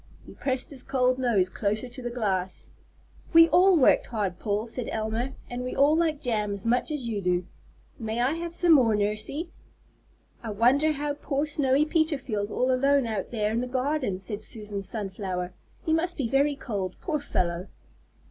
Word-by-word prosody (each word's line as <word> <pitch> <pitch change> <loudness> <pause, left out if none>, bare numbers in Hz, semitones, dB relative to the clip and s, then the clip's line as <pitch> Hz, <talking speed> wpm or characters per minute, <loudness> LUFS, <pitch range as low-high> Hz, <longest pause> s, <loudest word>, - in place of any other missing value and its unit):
He - - -12
pressed 265 +3 -3
his 270 -3 -6
cold 255 -1 +1
nose 225 -8 +2
closer 210 +5 -2
to 245 +1 -9
the 240 - -3
glass. 195 -6 -2 0.6
"We 330 0 +9
all 370 0 +6
worked 275 - +4
hard, 200 -6 -2
Paul," 210 0 -1
said 235 +1 -5
Elma, 225 +4 -2
"and 245 0 -5
we 255 - -4
all 285 +3 +5
like 320 -3 +1
jam 215 -6 -1
as 200 - -9
much 245 +5 +1
as 295 -6 -3
you 215 -3 -2
do. 180 -1 0 0.5
May 225 0 -3
I 250 +4 +2
have 340 +1 -5
some 350 -1 +3
more, 245 -8 +6
Nursey?" 215 - -2 0.9
"I 230 - -6
wonder 255 +9 +3
how 290 0 -2
poor 285 0 -2
Snowy 285 -1 +2
Peter 315 -1 +1
feels 210 -6 -3
all 255 +4 +1
alone 275 +1 +3
out 215 -4 -3
there 215 -3 -1
in 230 +2 0
the 250 - -3
garden," 260 -4 -1
said 200 +3 -5
Susan 210 -2 -4
Sunflower. 190 -3 -4 0.3
"He 320 - +2
must 345 +2 0
be 270 -6 0
very 280 +4 +2
cold, 200 -9 -4
poor 310 -4 -2
fellow!" 180 -9 -2
245 Hz, 185 wpm, -27 LUFS, 210-285 Hz, 0.9 s, We